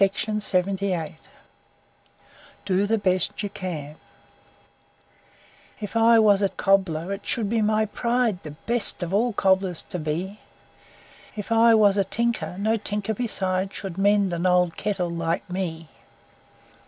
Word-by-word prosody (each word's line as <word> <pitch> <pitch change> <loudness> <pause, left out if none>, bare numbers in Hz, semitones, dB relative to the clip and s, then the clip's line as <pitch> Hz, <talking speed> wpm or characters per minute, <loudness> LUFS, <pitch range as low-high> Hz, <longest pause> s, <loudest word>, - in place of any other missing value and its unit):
UNKNOWN 195 -4 -1 1.5
DO 195 +1 +1
THE 225 +2 +2
BEST 185 0 0
YOU 205 - -2
CAN 155 -7 -6 1.8
If 210 +1 -7
I 230 0 +5
was 205 -3 +4
a 200 - +2
cobbler 190 -3 0
it 200 +1 -8
should 225 -4 0
be 225 +2 0
my 215 +1 +2
pride 235 -2 -1
The 155 - -8
best 210 +6 0
of 175 +2 -4
all 235 +4 +2
cobblers 190 -3 +1
to 180 - -5
be; 170 +7 -4 1.0
If 210 +1 -6
I 230 0 +6
was 205 -2 +4
a 200 - +3
tinker, 195 -5 -2
no 220 +3 +1
tinker 210 0 -3
beside 190 -4 -2
Should 190 -2 -6
mend 200 -2 +3
an 170 +2 0
old 180 -2 +2
kettle 190 -5 -2
like 165 0 -2
me. 170 -3 -4
195 Hz, 135 wpm, -24 LUFS, 180-215 Hz, 1.8 s, I